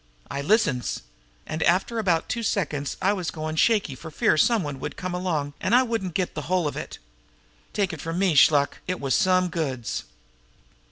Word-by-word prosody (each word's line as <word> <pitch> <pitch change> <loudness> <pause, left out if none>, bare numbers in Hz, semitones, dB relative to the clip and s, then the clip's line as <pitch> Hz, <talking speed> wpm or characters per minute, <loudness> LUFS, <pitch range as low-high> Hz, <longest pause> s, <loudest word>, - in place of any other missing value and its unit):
I 140 - -2
listens. 150 - +1 0.4
An' 155 +1 -4
after 190 +8 +2
about 175 -6 +1
two 235 - -2
seconds 150 -10 -1
I 195 +2 +4
was 180 -5 -3
goin' 155 -1 -4
shaky 205 - +2
for 155 +5 -9
fear 155 - +2
some 220 +6 +3
one 145 -3 -5
would - - -6
come 185 -1 -4
along 160 -6 -2
an' - - +2
I 255 - +6
wouldn't 225 -8 -3
get 185 -2 -1
the 150 - -4
whole 180 -4 +2
of 145 - -4
it. - - -6 0.7
Take 195 -4 0
it 160 - -7
from 165 +1 -4
me, 190 -2 +2
Shluk, 145 0 +4
it 185 0 -2
was 135 -2 -1
some 185 +3 +3
goods!" 135 -9 -3
170 Hz, 190 wpm, -25 LUFS, 150-190 Hz, 0.7 s, I